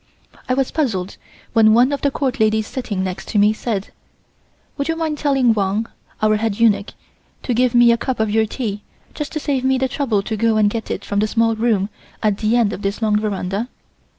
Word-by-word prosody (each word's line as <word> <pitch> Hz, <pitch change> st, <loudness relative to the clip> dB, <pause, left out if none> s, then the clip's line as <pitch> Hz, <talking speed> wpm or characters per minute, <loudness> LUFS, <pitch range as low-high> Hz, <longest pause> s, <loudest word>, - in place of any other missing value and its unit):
I 255 Hz, -, +2 dB
was 270 Hz, -1 st, 0 dB
puzzled 205 Hz, -, -2 dB, 0.4 s
when 220 Hz, -1 st, +5 dB
one 250 Hz, +4 st, +4 dB
of 285 Hz, -, -2 dB
the 285 Hz, -, +2 dB
Court 270 Hz, -1 st, -2 dB
ladies 220 Hz, 0 st, +2 dB
sitting 210 Hz, -6 st, -3 dB
next 185 Hz, -1 st, -5 dB
to -, -, -2 dB
me 205 Hz, +1 st, +5 dB
said: 215 Hz, -3 st, -3 dB, 0.8 s
"Would 280 Hz, -, -2 dB
you 325 Hz, -, 0 dB
mind 315 Hz, -2 st, -2 dB
telling 270 Hz, -5 st, +3 dB
Wang 205 Hz, +1 st, 0 dB, 0.4 s
(our 215 Hz, 0 st, +4 dB
head 220 Hz, -1 st, -2 dB
eunuch) 215 Hz, -3 st, +2 dB, 0.5 s
to 250 Hz, -, -1 dB
give 245 Hz, +1 st, +2 dB
me 240 Hz, 0 st, +7 dB
a 235 Hz, -, +3 dB
cup 260 Hz, 0 st, -3 dB
of 220 Hz, -1 st, +1 dB
your 220 Hz, +1 st, +2 dB
tea, 210 Hz, -4 st, -4 dB, 0.3 s
just 295 Hz, -2 st, -5 dB
to 310 Hz, -, -2 dB
save 275 Hz, -3 st, -1 dB
me 265 Hz, 0 st, +2 dB
the 265 Hz, 0 st, +1 dB
trouble 250 Hz, -7 st, -1 dB
to 220 Hz, +2 st, -3 dB
go 225 Hz, +1 st, +2 dB
and 210 Hz, -1 st, +3 dB
get 225 Hz, -1 st, -4 dB
it -, -, -4 dB
from 200 Hz, -, -1 dB
the 215 Hz, -, +2 dB
small 225 Hz, +1 st, +2 dB
room 215 Hz, -3 st, +1 dB, 0.3 s
at 210 Hz, -2 st, +1 dB
the 220 Hz, +2 st, +1 dB
end 225 Hz, -4 st, +2 dB
of -, -, -6 dB
this 200 Hz, 0 st, -2 dB
long 210 Hz, -1 st, +2 dB
veranda?" 205 Hz, +2 st, -2 dB
225 Hz, 220 wpm, -19 LUFS, 210-255 Hz, 0.8 s, me